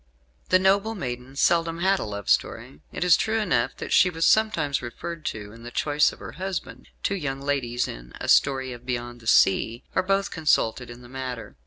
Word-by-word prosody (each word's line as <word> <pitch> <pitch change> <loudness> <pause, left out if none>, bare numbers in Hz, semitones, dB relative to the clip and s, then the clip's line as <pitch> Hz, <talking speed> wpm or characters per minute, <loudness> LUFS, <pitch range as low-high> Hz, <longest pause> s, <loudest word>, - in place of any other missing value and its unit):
The 185 - +6
noble 200 +4 +2
maiden 125 - -6
seldom 165 +3 +2
had 190 +2 +2
a - - -3
love 100 -2 -6
story. 75 - 0
It - - -3
is 180 -1 +6
true 220 +1 0
enough 140 - 0
that - - -4
she 185 - +6
was 165 -1 -1
sometimes 215 -10 +2
referred 155 +7 -7
to 105 -1 -5
in 115 +1 -14
the 120 - -8
choice 145 +4 +2
of - - -13
her - - -9
husband: 190 -2 -5 0.2
two - - 0
young 145 -8 -3
ladies 135 -4 -1
in - - -9
"A - - -5
Story 130 -2 +3
of 120 0 -11
Beyond 120 -1 -4
the 115 - -13
Sea" 110 +4 +3
are - - +2
both 195 +1 0
consulted 125 -7 +1
in 120 +1 -11
the - - -12
matter. 130 -2 -6
135 Hz, 205 wpm, -25 LUFS, 120-180 Hz, 0.2 s, The